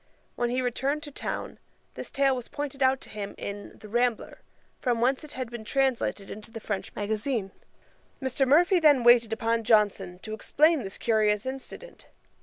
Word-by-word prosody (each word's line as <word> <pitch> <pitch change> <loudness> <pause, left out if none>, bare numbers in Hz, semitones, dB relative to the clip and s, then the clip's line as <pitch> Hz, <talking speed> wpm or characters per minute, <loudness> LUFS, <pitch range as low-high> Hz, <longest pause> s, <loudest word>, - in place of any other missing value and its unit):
When 240 0 0
he 255 +1 0
returned 275 +5 -1
to 295 - -8
town, - - -5 0.3
this - - -7
tale 275 -1 +2
was 250 -2 -6
pointed 285 -2 -5
out 260 0 +4
to - - -10
him 205 -1 -6
in 205 0 -7
The 215 - -12
Rambler, 240 +2 -1 0.4
from 245 -3 0
whence 260 +5 +1
it 300 - -11
had 255 -2 -5
been 235 -2 -7
translated 245 -4 0
into 210 +1 -8
the 225 0 -8
French 210 -3 -4
magazine. 210 0 -2 0.7
Mr. 265 0 0
Murphy 350 +7 +5
then 290 -6 +5
waited 235 -1 +6
upon 230 0 0
Johnson, 205 -5 +2
to 215 - -6
explain 300 +7 +3
this 195 -3 -7
curious 215 -1 +2
incident. 270 - -8
240 Hz, 175 wpm, -27 LUFS, 215-270 Hz, 0.7 s, waited